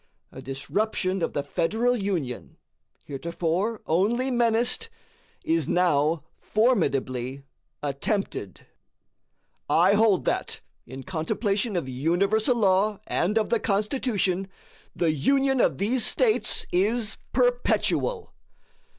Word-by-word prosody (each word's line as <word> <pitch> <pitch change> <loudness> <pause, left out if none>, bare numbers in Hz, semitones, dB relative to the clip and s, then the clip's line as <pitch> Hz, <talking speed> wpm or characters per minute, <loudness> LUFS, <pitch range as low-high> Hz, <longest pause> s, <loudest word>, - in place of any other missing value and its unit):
A - - -10
disruption 185 +7 -2
of 165 - -1
the 145 - -1
Federal 220 +12 0
Union, 180 - -3 0.5
heretofore 170 +8 -2
only 230 +10 +1
menaced, 240 - +1 0.5
is 330 0 0
now 160 -3 +2 0.2
formidably 140 - 0 0.4
attempted. 140 - -3 1.0
I 180 +4 +4
hold 210 -2 +3
that, - - -2 0.3
in 130 +2 -8
contemplation 195 - -1
of 170 -6 -1
universal 195 - +1
law 205 -1 +2
and 205 +6 0
of 220 - 0
the 235 - +3
Constitution, 205 -3 0 0.5
the 170 -2 +1
Union 270 - +2
of 140 - +2
these 230 - +1
States 445 - +1
is 215 +5 +1
perpetual. 250 - +1
200 Hz, 100 wpm, -25 LUFS, 160-235 Hz, 1.0 s, I